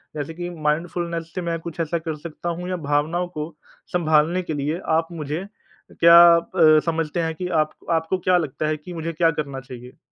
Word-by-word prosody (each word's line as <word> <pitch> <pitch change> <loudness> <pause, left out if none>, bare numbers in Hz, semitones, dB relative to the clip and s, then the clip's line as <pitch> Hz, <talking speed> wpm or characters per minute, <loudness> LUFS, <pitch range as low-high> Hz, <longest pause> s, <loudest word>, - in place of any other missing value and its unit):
जैसे 150 +1 -4
कि 175 +1 -5
माइंडफुलनेस 165 +1 -2
से 185 - -2
मैं 170 -1 -2
कुछ 170 0 -8
ऐसा 165 +1 0
कर 160 -1 -4
सकता 170 +2 -6
हूँ 175 +2 -4
या 185 - -1
भावनाओं 160 +5 +1
को 155 -2 -6 0.4
संभालने 165 +1 +2
के 160 - -4
लिए 150 +3 -2 0.2
आप 165 0 0
मुझे 160 +2 -4 0.5
क्या 170 0 +7 0.2
अ, 165 -3 +4
समझते 165 0 -1
हैं 160 -1 -2
कि 180 +3 -4 0.2
आपको 155 - -17
आपको 165 +3 0
क्या 180 0 +3
लगता 155 -2 -2
है 155 0 0
कि 165 +4 -10
मुझे 165 0 -4
क्या 165 +1 +3
करना 140 -3 -4
चाहिए? 125 -1 -11
165 Hz, 195 wpm, -22 LUFS, 155-170 Hz, 0.5 s, क्या